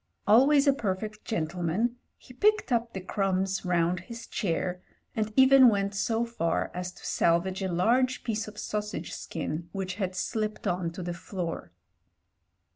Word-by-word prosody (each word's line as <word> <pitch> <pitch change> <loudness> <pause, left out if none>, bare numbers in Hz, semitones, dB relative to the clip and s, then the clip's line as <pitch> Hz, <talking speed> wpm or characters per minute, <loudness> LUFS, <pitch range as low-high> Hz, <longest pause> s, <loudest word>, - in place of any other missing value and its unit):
Always 275 +7 +6
a 280 - +5
perfect 210 -3 -3
gentleman, 180 +6 -1 0.2
he 250 - -15
picked 425 - +2
up 235 -1 +1
the 190 - -4
crumbs 190 0 -1
round 175 -1 +1
his 230 +6 -9
chair, 180 -1 -2 0.3
and 215 -1 -1
even 265 -1 +8
went 200 -2 0
so 225 +3 0
far 165 -9 -1
as 180 0 -4
to - - -14
salvage 180 +3 +1
a 190 -1 -1
large 245 +9 +2
piece 225 -2 -2
of 210 0 -10
sausage 210 -7 -4
skin 165 +1 -5
which 190 -1 -3
had 185 -1 -1
slipped 215 +3 -2
on 175 -1 0
to 180 - -6
the 175 0 -3
floor. 170 -1 -5
195 Hz, 155 wpm, -28 LUFS, 180-230 Hz, 0.3 s, even